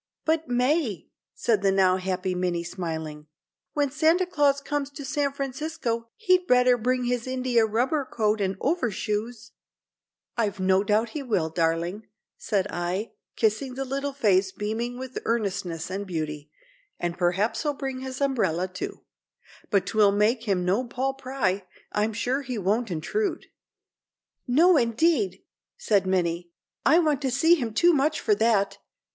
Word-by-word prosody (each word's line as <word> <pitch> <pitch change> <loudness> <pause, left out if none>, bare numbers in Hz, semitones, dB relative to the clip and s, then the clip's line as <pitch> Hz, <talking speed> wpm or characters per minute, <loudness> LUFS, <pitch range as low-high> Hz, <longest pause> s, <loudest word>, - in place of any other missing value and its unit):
"But, 320 0 +1
May," 250 - 0 0.3
said 220 -4 +1
the 195 -1 +3
now 190 -1 +4
happy 185 0 -2
Minnie, 180 -1 -1
smiling; 160 -4 -5 0.5
"when 290 -2 +1
Santa 320 +5 +3
Claus 290 -5 +2
comes 285 0 -3
to 285 -1 -8
San 280 +1 0
Francisco 270 -4 -3
he'd 365 -4 +2
better 250 0 +5
bring 250 +2 0
his 245 0 -1
India 250 -3 +2
rubber 255 +8 +1
coat 215 -2 +1
and 190 -1 -1
overshoes." 230 - -2 0.8
"I've 210 -4 -1
no 190 +1 +3
doubt 215 +3 +1
he 300 - -5
will, 190 - -1
darling," 170 +5 -1 0.3
said 195 -3 -1
I, 180 +5 -2 0.2
kissing 235 +4 0
the 270 +1 -3
little 275 +2 -2
face 195 -8 +2
beaming 225 +5 -3
with 260 0 -5
earnestness 195 -7 -2
and 200 +1 -4
beauty; 155 -4 -4 0.5
"and 175 -1 -2
perhaps 180 +5 0
he'll 295 -2 -1
bring 270 -2 -4
his 260 +1 -6
umbrella, 190 - +1
too, 185 0 -7 0.7
but 200 -3 +2
'twill 210 -2 +4
make 220 +4 +2
him 190 -4 0
no 195 +7 +2
Paul 260 +2 -2
Pry—I'm 215 -4 -2
sure 250 +6 -1
he 255 -3 -5
won't 210 +4 0
intrude." 280 - -2 1.0
"No, 325 +8 +5
indeed," 230 - +1 0.3
said 200 -3 +1
Minnie, 175 -2 0 0.4
"I 315 - +6
want 305 -5 +2
to 270 - 0
see 300 +7 +4
him 245 -9 0
too 345 0 +5
much 300 +2 +1
for 425 - +2
that. 220 - +2
230 Hz, 150 wpm, -26 LUFS, 190-270 Hz, 1.0 s, I